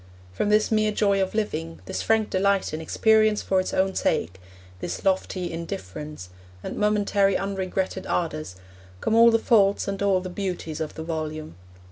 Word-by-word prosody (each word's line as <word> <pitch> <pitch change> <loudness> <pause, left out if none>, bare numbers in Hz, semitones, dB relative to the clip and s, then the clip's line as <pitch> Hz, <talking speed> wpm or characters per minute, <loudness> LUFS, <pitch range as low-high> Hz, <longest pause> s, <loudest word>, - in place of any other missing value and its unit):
From 205 - -1
this 215 +1 +3
mere 215 -1 +2
joy 200 -2 +2
of 190 +2 -2
living, 80 - -2
this - - -3
frank 220 -1 +1
delight 195 -2 +1
in 155 - -3
experience 215 +5 +3
for 190 - +2
its 185 - -2
own 190 0 +1
sake, 90 - -1 0.4
this - - -5
lofty 185 -2 0
indifference, 150 - -6 0.3
and - - -5
momentary 205 -2 +2
unregretted 190 -1 -3
ardours, 155 - -2 0.4
come 220 - -1
all 230 +1 +7
the 225 - +4
faults 205 -3 +3
and 195 0 -3
all 195 -2 +3
the 185 - -6
beauties 180 -4 -4
of 155 - -4
the 160 - -5
volume. 155 - -4
190 Hz, 165 wpm, -25 LUFS, 160-210 Hz, 0.4 s, all